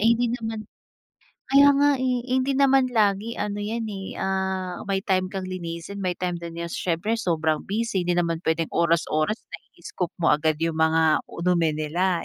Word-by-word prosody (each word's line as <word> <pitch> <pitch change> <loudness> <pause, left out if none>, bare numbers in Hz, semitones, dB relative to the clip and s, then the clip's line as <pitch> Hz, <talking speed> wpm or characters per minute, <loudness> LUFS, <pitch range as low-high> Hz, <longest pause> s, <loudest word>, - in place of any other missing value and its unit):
Eh, 225 - +4
hindi 240 0 +1
naman 225 -2 -4 0.9
kaya 280 +1 +8
nga, 290 +1 +4
eh, 255 -1 +1
hindi 260 +1 +2
naman 270 -1 +5
lagi 210 0 +2
ano 205 0 -2
'yan, 225 +2 -3
eh, 195 -1 -6
ah, 190 -1 -2
may 195 -1 +1
time 185 -1 +1
kang 190 -1 -4
linisin, 175 +2 -6
may 180 - +1
time 180 -1 -1
din 170 -1 -7
na 170 0 -3
siyempre 180 +8 -1
sobrang 160 -5 0
busy, 205 -2 -1
hindi 175 - +1
naman 170 -1 0
puwedeng 160 0 0
oras-oras 170 +2 +1 0.2
na-i-scoop 180 -2 -6
mo - - +4
agad 155 0 +1
'yong 165 -1 0
mga 160 0 +3
u - - -8
dumi 170 -3 +3
nila. 170 +4 0
185 Hz, 175 wpm, -24 LUFS, 165-215 Hz, 0.9 s, kaya